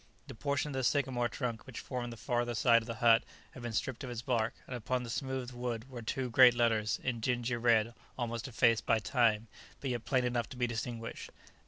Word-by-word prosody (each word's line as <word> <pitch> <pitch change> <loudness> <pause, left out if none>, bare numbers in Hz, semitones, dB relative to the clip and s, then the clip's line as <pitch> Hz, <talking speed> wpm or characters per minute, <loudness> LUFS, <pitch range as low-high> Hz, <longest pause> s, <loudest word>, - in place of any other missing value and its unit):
The - - -9
portion 140 +4 -1
of - - -5
the 130 0 -1
sycamore 125 -3 +1
trunk 120 -3 -4
which 130 - -7
formed 125 -2 -4
the 115 - -8
farther 120 0 -1
side 115 0 +5
of 110 - -10
the 115 - -4
hut 115 0 +5 0.3
had 130 - -11
been 120 -1 -4
stripped 120 +4 -2
of 130 - -5
its 120 -1 -5
bark, 115 -3 0
and 125 - -6
upon 125 +2 -1
the 115 - -5
smooth 130 -1 -3
wood 120 -1 -4
were 120 -2 -6
two 125 +2 -3
great 125 0 +8
letters 115 -2 +2
in 120 -3 -1
dingy 120 +1 0
red 115 -1 +3 0.2
almost 115 -1 -3
effaced 115 -2 +2
by 115 - +4
time, 110 -1 +2 0.3
but 135 - -2
yet 120 -2 -3
plain 125 0 +1
enough 120 -1 -1
to 130 - -9
be 125 - +2
distinguished. 115 0 -5
120 Hz, 220 wpm, -32 LUFS, 115-125 Hz, 0.3 s, great